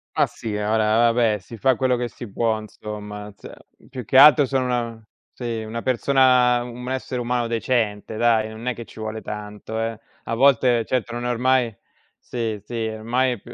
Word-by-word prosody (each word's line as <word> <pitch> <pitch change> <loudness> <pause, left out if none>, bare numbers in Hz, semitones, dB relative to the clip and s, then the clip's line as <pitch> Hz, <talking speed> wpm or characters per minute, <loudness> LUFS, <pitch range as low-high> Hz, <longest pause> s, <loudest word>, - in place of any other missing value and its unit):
Ma - - +4
sì, 110 -2 -6
ora 110 +2 +2
vabbè, 115 -3 +2
si 110 +4 -12
fa 130 +2 +3
quello 130 +1 +1
che 120 0 -2
si 120 - -9
può 110 0 0
insomma, 105 -1 -8
ze - - -12 0.4
più 125 -2 -6
che 130 - +1
altro 145 0 +8
sono 130 -1 0
una 115 -3 -2 0.3
sì, 115 -3 -4
una 115 +2 -5
persona 125 -1 +3
un 125 +1 -7
essere 130 -1 -3
umano 120 0 0
decente 115 -2 -1
dai, 110 -2 +2
non 110 +2 -9
è 125 - 0
che 115 0 -9
ci - - -14
vuole 110 0 -5
tanto, 105 +1 -6
eh. 115 -1 -3 0.2
A - - -4
volte, 125 -2 +4
certo 120 -2 -2
non 120 0 -4
è - - 0
ormai 125 -2 +1 0.4
sì, 115 -4 -4
sì, 115 -1 -3
ormai 120 +4 0
è 115 - -8
più 120 - -13
115 Hz, 190 wpm, -22 LUFS, 110-125 Hz, 0.4 s, altro